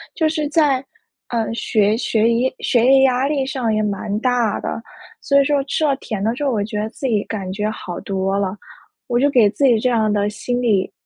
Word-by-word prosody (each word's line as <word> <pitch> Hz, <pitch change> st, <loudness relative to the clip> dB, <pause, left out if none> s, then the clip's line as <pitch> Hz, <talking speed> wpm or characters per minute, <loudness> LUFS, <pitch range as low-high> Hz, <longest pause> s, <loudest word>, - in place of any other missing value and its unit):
就 320 Hz, -, +2 dB
是 305 Hz, -1 st, -1 dB
在， 290 Hz, -4 st, +2 dB, 0.5 s
呃， 225 Hz, -2 st, -1 dB
学 215 Hz, -2 st, +1 dB
学 230 Hz, -1 st, +1 dB
业 240 Hz, +3 st, +1 dB
学 240 Hz, -1 st, +2 dB
业 265 Hz, +1 st, +6 dB
压 260 Hz, 0 st, +2 dB
力 280 Hz, -2 st, 0 dB
上 255 Hz, -4 st, -1 dB
也 215 Hz, -, +1 dB
蛮 205 Hz, 0 st, -2 dB
大 245 Hz, -3 st, +1 dB
的， 230 Hz, -, -4 dB, 0.4 s
所 280 Hz, 0 st, +3 dB
以 -, -, +1 dB
说 285 Hz, -1 st, +1 dB
吃 310 Hz, +3 st, -1 dB
了 280 Hz, -2 st, +2 dB
甜 215 Hz, -7 st, -5 dB
的 225 Hz, +2 st, +1 dB
之 265 Hz, -, -5 dB
后， 275 Hz, -, +1 dB
我 215 Hz, -4 st, 0 dB
觉 210 Hz, 0 st, -5 dB
得 215 Hz, -, -3 dB
自 265 Hz, +3 st, -5 dB
己 215 Hz, -4 st, +1 dB
感 195 Hz, -4 st, -5 dB
觉 210 Hz, +2 st, -2 dB
好 180 Hz, -5 st, -6 dB
多 195 Hz, 0 st, -1 dB
了， 200 Hz, 0 st, -2 dB, 0.5 s
我 240 Hz, -, 0 dB
就 285 Hz, +3 st, +3 dB
给 240 Hz, -7 st, +4 dB
自 255 Hz, -, -3 dB
己 240 Hz, -4 st, +4 dB
这 255 Hz, -, +1 dB
样 220 Hz, -3 st, +1 dB
的 205 Hz, 0 st, +1 dB
心 245 Hz, +4 st, -3 dB
理 205 Hz, -6 st, +1 dB
230 Hz, 245 characters per minute, -19 LUFS, 210-265 Hz, 0.5 s, 业